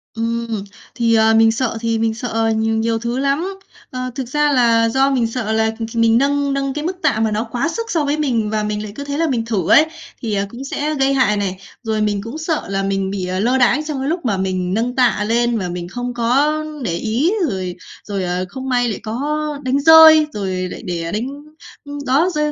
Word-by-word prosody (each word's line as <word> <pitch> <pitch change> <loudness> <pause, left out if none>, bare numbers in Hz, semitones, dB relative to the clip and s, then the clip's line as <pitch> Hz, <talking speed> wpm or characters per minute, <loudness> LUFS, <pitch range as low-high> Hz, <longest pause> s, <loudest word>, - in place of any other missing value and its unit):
Ừm, 230 -2 -2 0.3
thì, 230 -1 +2
ờ, 220 0 +4
mình 225 0 +5
sợ 230 -1 -2
thì 230 -1 0
mình 225 0 +1
sợ, 245 +2 -5
ờ, 225 0 0
nhiều 225 +1 0
thứ 235 +2 -3
lắm. 290 +8 -1 0.4
Ờ, 255 0 -4
thực 260 -3 -4
ra 295 +2 +1
là 230 -3 +3
do 270 +3 +2
mình 240 -4 +1
sợ 225 -2 -3
là, 220 0 +2
kh 225 0 -6
mình 230 0 +4
nâng 280 +1 +1
nâng 275 -1 -1
cái 300 +1 -4
mức 365 +2 -3
tạ, 275 -9 +1
mà 220 -1 +1
nó 215 +2 0
quá 250 +6 0
sức 455 +5 -4
so 320 -3 +1
với 290 +2 0
mình 235 -8 0
và 215 -1 -1
mình 210 0 -2
lại 210 - -7
cứ 285 - -6
thế 285 +1 -4
là 330 0 +1
mình 230 -3 -1
thử 205 -5 -1
ấy, 315 - +7 0.4
thì, 220 -3 -3
à, 200 0 0
cũng 240 +4 -8
sẽ 295 +2 -2
gây 270 0 +2
hại 245 -6 +2
này. 190 -2 -2 0.3
Rồi 220 -1 -1
mình 205 -1 0
cũng 235 +7 -6
sợ 320 -1 -2
là 195 0 -1
mình 195 0 -1
bị, 190 -2 -3
ờ, 185 +1 -2
lơ 245 +5 +2
đãng 260 +4 +3
trong 295 -3 -3
cái 270 +3 -2
lúc 340 -4 -2
mà 200 -4 +1
mình 185 -1 -1
nâng 240 +3 -1
tạ 245 -5 +2
lên 235 0 +1
và 180 -3 -3
mình 175 0 -5
không 245 +5 -5
có 250 +6 +2 0.3
để 170 - -1
ý 230 - 0 0.2
rồi 185 -3 -4 0.3
rồi, 200 -2 -2
à, 180 +1 -1
không 265 0 -6
may 245 -1 +2
lại 210 - -4
có 275 +8 -2 0.3
đánh 260 +2 +1
rơi, 315 0 +8
rồi 195 -2 -3 0.2
lại - - -7
để 170 -2 -3
đánh 225 +5 -2 0.6
ưm, 285 0 -7
đó, 285 +8 +3
rơi 300 0 +1
235 Hz, 240 wpm, -19 LUFS, 215-275 Hz, 0.6 s, rơi